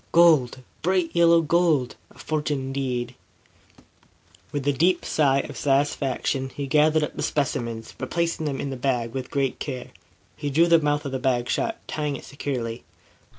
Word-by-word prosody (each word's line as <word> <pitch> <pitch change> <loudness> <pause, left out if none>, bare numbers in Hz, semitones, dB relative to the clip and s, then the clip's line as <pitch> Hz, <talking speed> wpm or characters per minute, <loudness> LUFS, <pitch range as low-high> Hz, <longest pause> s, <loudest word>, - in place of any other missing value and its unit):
"Gold! 155 -7 +4 0.2
Bright 180 -1 +1
yellow 170 -1 +5
gold! 160 -5 +2
A - - -20
fortune, 150 -2 -2
indeed!" 130 -2 -3 1.4
With 145 -1 -3
a 145 - +3
deep 170 +7 +2
sigh 140 -3 +2
of - - -9
satisfaction, 135 -1 0
he 140 - -3
gathered 155 +2 +3
up - - -4
the - - -4
specimens, 115 -6 -2
replacing 170 -2 -1
them 135 -2 -2
in 140 - -3
his 130 - -6
bag 120 -3 -1
with 130 -1 -4
great 135 -2 -1
care. 130 -4 -5 0.4
He 145 - -3
drew 160 +5 +4
the 170 -1 +5
mouth 145 -1 0
of 140 - -3
the 130 - -2
bag 125 -2 0
shut, 225 - -1
tying 150 -2 -2
it - - -9
securely. 125 -5 -4
140 Hz, 165 wpm, -24 LUFS, 130-155 Hz, 1.4 s, yellow